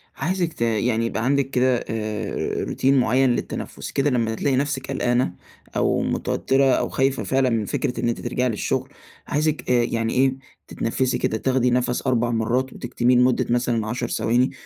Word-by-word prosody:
عايزِِك 175 -1 -1
ت - - -13
يعني 115 0 +1
يبقى 115 0 -2
عندِك 140 0 +1
كده، 130 -1 +2
آآ 110 -2 -3
روتين 135 +1 +1
مُعيّن 130 +2 +3
للتنفس - - -5
كده، 140 +1 +1
لمّا 115 -4 0
تلاقي 135 +3 0
نفسِك 135 0 -1
قلقانة 120 -6 +1 0.4
أو - - +1
متوترة 135 +1 +1
أو - - 0
خايفة 135 0 0
فعلًا 135 -1 +1
من 115 -3 0
فكرة 125 - -2
إن 120 - +1
أنتِ 120 - -3
ترجعي 125 +1 -1
للشغل، 110 - -2 0.4
عايزِك 155 +1 -1
آآ 120 -1 +4
يعني 115 -1 -1
إيه، 130 +1 +3 0.3
تتنفسي 130 +3 -1
كده، 110 - -1
تاخدي 125 +1 +1
نفس 125 +1 0
4 120 -2 +2
مرات 120 +3 0
وتكتمِيه 125 0 +1
لمُدة 125 +1 +3
مثلًا 120 -2 0
10 120 +2 -2
ثواني، 125 +4 +1
125 Hz, 170 wpm, -23 LUFS, 115-130 Hz, 0.4 s, آآ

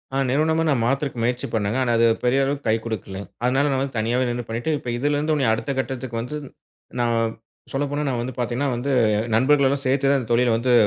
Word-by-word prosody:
ஆ, - - +1
நிறுவனமா 160 +4 +2
நான் 130 -6 +2
மாத்துறதக்கு 135 +1 -1
முயற்சி 120 +1 -1
பண்ணேங்க. 110 +1 0
ஆனா, 120 - 0
அது 115 - +4 0.2
பெரிய 130 +3 +3
அளவுக்கு 140 +1 -2
கை 110 - +4
குடுக்கலங்க. 100 -3 -5 0.2
அதுனால 135 +4 +2
நான் 135 - +1
வந்து 135 -2 -3
தனியாவே 120 +3 +1
நின்னு 120 0 -3
பண்ணிட்டு 120 +8 -2
இப்ப 125 -3 -5
இதுலேருந்து 145 +4 +1
இன்னுமும், 135 -6 +2
அடுத்த 115 +5 -2
கட்டத்துக்கு 130 -3 -3
வந்து, 125 +6 -5 0.6
நான், 115 -1 +1 0.4
சொல்லப்போனா, 145 +2 -1
நான் 120 -3 -1
வந்து 125 0 -5
பாத்தீங்கன்னா, 125 +4 -1
வந்து 130 +4 -2 0.4
நண்பர்கள் 140 +4 +4
எல்லாம் 140 0 -1
சேர்த்து 135 +1 +2
தான், 140 - +3
இந்த 115 - -9
தொழில 120 0 +3
வந்து 125 +2 +1
125 Hz, 205 wpm, -23 LUFS, 115-140 Hz, 0.6 s, அது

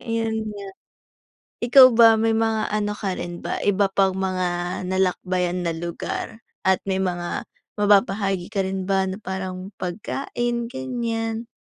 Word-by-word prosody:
ayun 225 -1 -1 0.2
nga. 200 - -7 1.0
Ikaw 255 +1 +9
ba, 225 -1 +8
may 225 +1 +2
mga 225 -1 +1
ano 210 0 -1
ka 195 -3 -3
rin 175 0 -6
ba - - -3
iba 200 -1 +3
pang 195 -1 +2
mga 185 -1 -1 0.4
nalakbayan 180 -1 0
na 165 - 0
lugar 170 +5 -5 0.2
at 190 0 +3
may 190 0 0
mga 175 -2 -2 0.3
mababahagi 200 -2 +2
ka 200 -3 -1
rin 190 0 -3
ba 190 -1 +1
na 190 - -5
parang 190 -1 -6
pagkain 235 +5 -3
ganyan. 225 - -3
195 Hz, 140 wpm, -23 LUFS, 185-225 Hz, 1.0 s, Ikaw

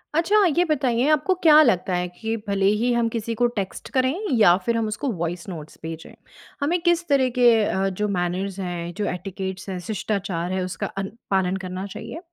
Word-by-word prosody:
अच्छा, 405 +6 +4
ये 350 - +5
बताइए 260 -4 +1
आपको 310 +5 +3
क्या 310 -2 +8
लगता 190 - +2
है 180 0 -1
कि 220 +6 -4
भले 200 -1 +1 0.2
ही 245 +1 +2
हम 235 -1 +2
किसी 230 0 -3
को 245 - +2
टेक्स्ट 195 -3 -4
करें 260 0 +2 0.3
या 175 -5 +7
फिर 235 -1 +1
हम 225 -1 0
उसको 215 +7 -3
वॉइस 175 +2 -3
नोट्स 160 -4 -9
भेजें। 165 0 -7 0.5
हमें 330 +5 +1
किस 345 0 +1
तरह 270 -3 +3
के 245 -1 +6 0.2
अ, 195 -1 0
जो 210 +3 -2
मैनर्स 185 +1 -2
हैं, 175 -2 -4
जो 205 +3 -3
एटिकेट्स 190 +1 -6
हैं, 185 -1 -4
शिष्टाचार 195 -5 -2
है 185 0 -1
उसका 180 0 -4
अन 195 0 -5 0.2
पालन 190 -1 +1
करना 185 +1 -5
चाहिए? 200 - -8
200 Hz, 195 wpm, -23 LUFS, 180-250 Hz, 0.5 s, क्या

